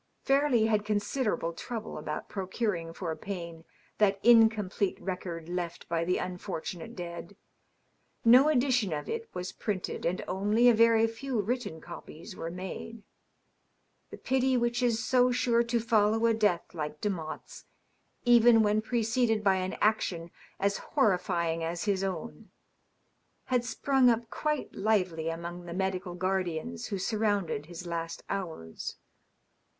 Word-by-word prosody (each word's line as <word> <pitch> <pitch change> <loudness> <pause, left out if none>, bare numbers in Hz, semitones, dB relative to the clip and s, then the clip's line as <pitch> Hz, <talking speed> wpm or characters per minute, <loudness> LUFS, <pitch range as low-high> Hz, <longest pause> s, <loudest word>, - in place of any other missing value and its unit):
Fairleigh 275 -5 +3
had 215 -2 +2
considerable 210 -4 -1
trouble 225 +4 -6
about 150 0 -5
procuring 190 -3 -2
for 165 -1 -4
Payne 170 -4 -7 0.3
that 200 -2 +3
incomplete 220 -5 +4
record 175 -3 -5
left 175 -1 -4
by 165 0 0
the 180 +2 +1
unfortunate 180 +2 -5
dead. 170 +1 -7 0.9
No 255 +6 +8
edition 245 - +2
of 150 - -4
it 460 0 -4
was 180 +1 -4
printed, 200 -5 -4
and 175 +2 -1
only 210 +6 +2
a 240 - +8
very 230 0 +5
few 230 +2 -3
written 210 -5 -2
copies 170 -1 -10
were 165 - -5
made. 190 +5 -7 1.1
The - - -9
pity 260 0 +1
which 240 0 0
is 230 -3 +1
so 250 0 +4
sure 240 -1 +2
to 235 0 +1
follow 225 -1 +2
a 230 - +4
death 210 -6 +1
like 150 -2 -4
Demotte's, 175 -7 -5 0.6
even 240 -1 +7
when 210 +1 +2
preceded 225 -1 +1
by 195 -2 +4
an 185 +1 -2
action 175 -6 +1 0.3
as 200 0 +1
horrifying 175 -4 +1
as 170 +1 -3
his 195 -2 0
own, 195 +4 -5 1.0
had 245 -1 +3
sprung 255 +2 +3
up 230 0 0
quite 300 -1 -2
lively 185 -7 0
among 170 +1 -6
the 170 - -5
medical 190 -1 -2
guardians 175 - -2
who 200 - -3
surrounded 200 -7 -1
his 175 +1 -8
last 165 -1 -4
hours. 165 - -5
200 Hz, 135 wpm, -29 LUFS, 175-230 Hz, 1.1 s, No